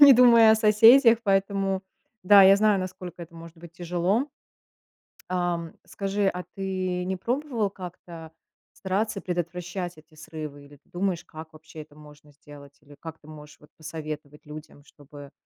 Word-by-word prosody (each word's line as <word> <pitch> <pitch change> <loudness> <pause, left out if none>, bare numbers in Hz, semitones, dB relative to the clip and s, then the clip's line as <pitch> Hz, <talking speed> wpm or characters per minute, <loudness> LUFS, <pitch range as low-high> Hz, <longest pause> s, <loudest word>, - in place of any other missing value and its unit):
Не 285 -1 +10
думая 235 -2 +6
о - - +5
соседях, 225 +3 +6
поэтому 195 -1 0 0.4
да, 200 +1 +7
я 195 +1 +7
знаю, 210 -1 +2
насколько 185 -2 -8
это 170 0 -13
может 165 0 -13
быть 170 0 -14
тяжело. 180 - -1 1.0
Ам, 175 -2 -2
скажи, 200 0 -2
а 180 -1 -3
ты 185 -2 -3
не 190 +1 -3
пробовал 240 -1 -2
как-то 170 -3 -11 0.4
стараться 200 +2 -3
предотвращать 180 0 -5
эти 155 +1 -20
срывы, 155 -2 -9
или 145 +1 -17
ты 140 - -29
думаешь, 180 -1 -2
как 160 0 -12
вообще 155 0 -12
это 150 -1 -16
можно 150 -1 -17
сделать, 140 0 -16
или 145 -1 -17
как 160 -1 -9
ты 150 - -21
можешь 150 -1 -13
вот 150 - -20
посоветовать 155 -1 -8
людям, 150 -1 -12
чтобы 145 0 -15
175 Hz, 155 wpm, -25 LUFS, 155-195 Hz, 1.0 s, Не